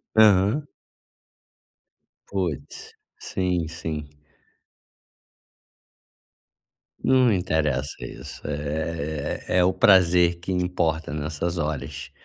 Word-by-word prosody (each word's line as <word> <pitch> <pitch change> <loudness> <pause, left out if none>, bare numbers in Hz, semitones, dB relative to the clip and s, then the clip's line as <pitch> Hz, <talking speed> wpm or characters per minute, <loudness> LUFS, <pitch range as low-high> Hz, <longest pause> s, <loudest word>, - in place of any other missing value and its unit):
Aham. 110 +6 +5 1.6
Putz. 90 -7 -4 0.3
Sim, 90 -3 -1
sim. 80 -2 -5 3.0
Não 130 -2 +4
interessa 75 -7 0
isso, - - -9
é 75 0 -3
é, - - +5
o 95 +1 +3
prazer 90 -2 +5
que 85 +2 -5
importa 85 -4 -1
nessas 80 +3 -3
horas. 75 -3 -4
85 Hz, 75 wpm, -24 LUFS, 75-95 Hz, 3.0 s, Aham